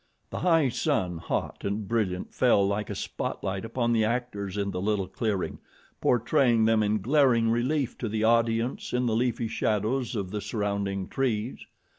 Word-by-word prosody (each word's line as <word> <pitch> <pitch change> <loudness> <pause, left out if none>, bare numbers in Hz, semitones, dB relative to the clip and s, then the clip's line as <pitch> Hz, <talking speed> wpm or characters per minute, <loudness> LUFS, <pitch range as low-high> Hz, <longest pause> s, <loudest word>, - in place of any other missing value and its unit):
The - - -3
high 165 -6 +3
sun, 90 -7 -1
hot - - -3
and 100 +1 -2
brilliant, 100 -5 -1
fell 105 -6 +4
like 100 +1 -2
a - - -3
spotlight 95 0 -3
upon 120 +1 0
the 110 -1 +3
actors 110 -4 -2
in 100 -1 -1
the 90 - -3
little 100 -2 0
clearing, 100 0 -2 0.4
portraying 120 -1 +3
them 110 -1 +3
in 105 0 +1
glaring 125 -3 +4
relief 125 +2 0
to 115 - -2
the 110 +1 -1
audience 115 +1 +1
in 125 0 +1
the 115 -2 +1
leafy 120 0 0
shadows 110 +3 -1
of 95 -4 -3
the 105 0 -3
surrounding 100 -2 -2
trees. 120 -3 -2
110 Hz, 165 wpm, -27 LUFS, 100-120 Hz, 0.4 s, fell